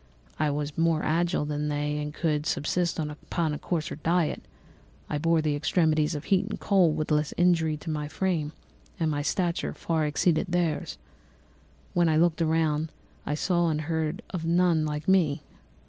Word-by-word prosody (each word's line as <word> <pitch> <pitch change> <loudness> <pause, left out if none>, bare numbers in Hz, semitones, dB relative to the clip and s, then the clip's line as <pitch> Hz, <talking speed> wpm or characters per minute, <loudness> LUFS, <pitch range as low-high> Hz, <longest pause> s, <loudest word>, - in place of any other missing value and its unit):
I 150 - +2
was 145 +1 -3
more 165 -1 +2
agile 165 -1 +1
than 150 0 -2
they 150 0 -1
and 150 0 -3
could 150 -1 -1
subsist 170 +3 0
upon 150 0 -2
coarser 160 -5 -3
diet; 165 +1 0 0.7
I 150 - 0
bore 165 0 +2
the 150 -1 +1
extremes 155 0 +1
of 145 - -4
heat 195 +1 +2
and - - -5
cold 180 -6 +3
with 155 0 -2
less 150 -1 +1
injury 165 -3 +3
to 160 - -8
my 150 -1 -2
frame; 160 -3 -1 0.5
my 155 -3 0
stature 170 +3 -1
far 160 -2 0
exceeded 155 +4 +1
theirs. 175 - -1 1.0
When 175 -1 +3
I 155 - +3
looked 170 0 +2
around 160 -1 +1 0.4
I 150 - 0
saw 175 +1 +1
and 155 -1 -1
heard 160 +5 -2
of 180 -4 -4
none 170 -1 +3
like 150 0 -4
me. 175 -7 +3
160 Hz, 160 wpm, -27 LUFS, 150-170 Hz, 1.0 s, cold